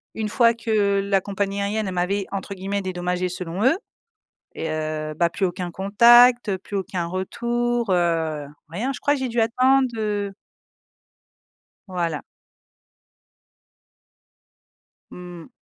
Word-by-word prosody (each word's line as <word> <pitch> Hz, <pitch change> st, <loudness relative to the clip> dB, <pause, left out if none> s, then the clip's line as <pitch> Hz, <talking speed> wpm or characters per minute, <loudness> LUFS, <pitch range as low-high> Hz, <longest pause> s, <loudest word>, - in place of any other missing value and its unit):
une 215 Hz, -1 st, -2 dB
fois 230 Hz, +1 st, +4 dB
que, 215 Hz, -3 st, +1 dB
la 195 Hz, -1 st, +1 dB
compagnie 200 Hz, 0 st, -2 dB
aérienne, 210 Hz, +1 st, -1 dB
elle 190 Hz, -, -3 dB
m'avait, 190 Hz, +3 st, 0 dB
entre 200 Hz, 0 st, -4 dB
guillemets, 195 Hz, +1 st, -3 dB
«dédommagée», 180 Hz, -1 st, -2 dB
selon 180 Hz, +2 st, -4 dB
eux. 270 Hz, +7 st, +4 dB, 0.8 s
Et 160 Hz, -, -3 dB
heu, 155 Hz, 0 st, -3 dB
bah 170 Hz, +2 st, +1 dB
plus 190 Hz, -, -1 dB
aucun 180 Hz, 0 st, -3 dB
contact, 235 Hz, +2 st, +5 dB
plus 200 Hz, +2 st, -6 dB
aucun 185 Hz, -2 st, -3 dB
retour, 235 Hz, +5 st, -1 dB
heu, 165 Hz, -4 st, 0 dB, 0.2 s
rien, 215 Hz, +11 st, -2 dB
je 275 Hz, -, -7 dB
crois 290 Hz, -, +2 dB
que 290 Hz, -, -2 dB
j'ai 260 Hz, -, -1 dB
dû 235 Hz, 0 st, -1 dB
attende 255 Hz, +4 st, +3 dB
heu 205 Hz, -2 st, -2 dB, 1.5 s
Voilà. 170 Hz, -5 st, -2 dB, 2.9 s
Mmh. 175 Hz, +1 st, -10 dB
195 Hz, 125 wpm, -23 LUFS, 180-225 Hz, 2.9 s, contact